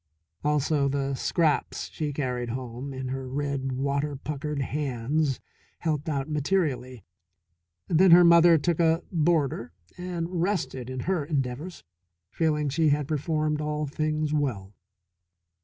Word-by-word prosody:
Also 150 Hz, -1 st, +2 dB
the 140 Hz, 0 st, -1 dB
scraps 150 Hz, +3 st, 0 dB
she 150 Hz, -2 st, -3 dB
carried 125 Hz, -4 st, -2 dB
home 125 Hz, +2 st, -5 dB
in 130 Hz, -1 st, -5 dB
her 130 Hz, 0 st, -4 dB
red, 140 Hz, -1 st, -2 dB
water 140 Hz, +2 st, -1 dB
puckered 150 Hz, +1 st, -4 dB
hands 140 Hz, +1 st, -1 dB, 0.4 s
helped 155 Hz, -2 st, -2 dB
out 140 Hz, -2 st, -1 dB
materially. 145 Hz, -, -1 dB, 0.8 s
Then 180 Hz, +3 st, +5 dB
her 175 Hz, +1 st, +9 dB
mother 170 Hz, 0 st, +7 dB
took 170 Hz, +2 st, 0 dB
a 165 Hz, 0 st, +3 dB
boarder 150 Hz, -, +1 dB, 0.3 s
and 175 Hz, -1 st, -3 dB
rested 170 Hz, -, -1 dB
in 130 Hz, -1 st, -4 dB
her 180 Hz, -1 st, 0 dB
endeavours, 140 Hz, +3 st, -3 dB, 0.5 s
feeling 150 Hz, -2 st, 0 dB
she 150 Hz, +3 st, +2 dB
had 145 Hz, -1 st, +1 dB
performed 155 Hz, 0 st, -1 dB
all 150 Hz, 0 st, -2 dB
things 155 Hz, +1 st, -1 dB
well. 115 Hz, -10 st, -1 dB
150 Hz, 125 wpm, -27 LUFS, 135-160 Hz, 0.8 s, her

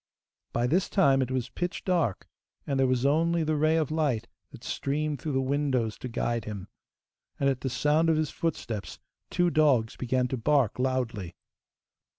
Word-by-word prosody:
By 120 Hz, -, 0 dB
this 175 Hz, +9 st, +1 dB
time 135 Hz, -9 st, +4 dB
it 130 Hz, -, -1 dB
was 130 Hz, -2 st, -2 dB
pitch 175 Hz, 0 st, -4 dB
dark, 170 Hz, -, 0 dB, 0.4 s
and 140 Hz, -2 st, -1 dB
there 135 Hz, -, +4 dB
was 130 Hz, 0 st, +1 dB
only 165 Hz, +3 st, +2 dB
the 155 Hz, 0 st, 0 dB
ray 155 Hz, +2 st, +3 dB
of 155 Hz, -1 st, 0 dB
light 140 Hz, -8 st, 0 dB, 0.2 s
that -, -, -13 dB
streamed 150 Hz, 0 st, -2 dB
through 150 Hz, -, -3 dB
the 135 Hz, -, +2 dB
windows 130 Hz, -5 st, 0 dB
to -, -, -5 dB
guide 115 Hz, 0 st, -1 dB
him, 100 Hz, -2 st, -6 dB, 0.7 s
and 140 Hz, -, +2 dB
at 135 Hz, -2 st, 0 dB
the 135 Hz, -, -1 dB
sound 150 Hz, +5 st, +2 dB
of 160 Hz, -, +3 dB
his 155 Hz, -1 st, 0 dB
footsteps 120 Hz, -10 st, -3 dB, 0.3 s
two 175 Hz, -1 st, +2 dB
dogs 140 Hz, -8 st, +3 dB
began 125 Hz, 0 st, 0 dB
to 130 Hz, -, -2 dB
bark 130 Hz, -2 st, +2 dB
loudly. 125 Hz, -8 st, -1 dB
135 Hz, 175 wpm, -28 LUFS, 125-155 Hz, 0.7 s, time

